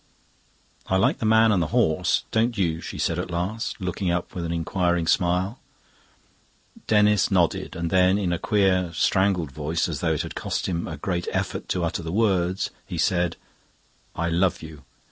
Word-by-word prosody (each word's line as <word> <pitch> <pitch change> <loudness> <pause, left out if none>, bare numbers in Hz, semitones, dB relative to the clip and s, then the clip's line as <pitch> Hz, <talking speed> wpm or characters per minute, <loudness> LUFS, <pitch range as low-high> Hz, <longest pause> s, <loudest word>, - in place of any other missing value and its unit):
"I 95 - +2
like 95 - +2
the 110 - 0
man 110 0 +5
and 95 -4 +2
the 80 - 0
horse; 90 -5 +1
don't 115 +1 +1
you?" 85 -4 0
she - - -7
said 85 0 0
at 90 - -4
last, 95 +8 -3
looking 90 0 -2
up 85 0 -2
with 90 - -4
an 85 - -3
inquiring 85 0 0
smile. 90 +6 +1 1.3
Denis 105 -1 +4
nodded, 90 -4 +1
and 85 0 -3
then 95 +1 +4
in 95 -4 0
a 85 - -2
queer, 95 -4 +2
strangled 95 -4 +1
voice, 75 +4 -1
as - - -4
though - - +1
it - - -1
had - - -7
cost - - -3
him 85 -2 -2
a 80 - -6
great 85 +3 -3
effort - - -3
to 90 - 0
utter 85 +1 -2
the 80 -1 -5
words, 95 -3 +1
he 90 -3 -7
said, 90 0 +1 0.8
"I 85 0 -1
love 85 +1 +1
you." 75 -2 -11
90 Hz, 185 wpm, -24 LUFS, 85-95 Hz, 1.3 s, man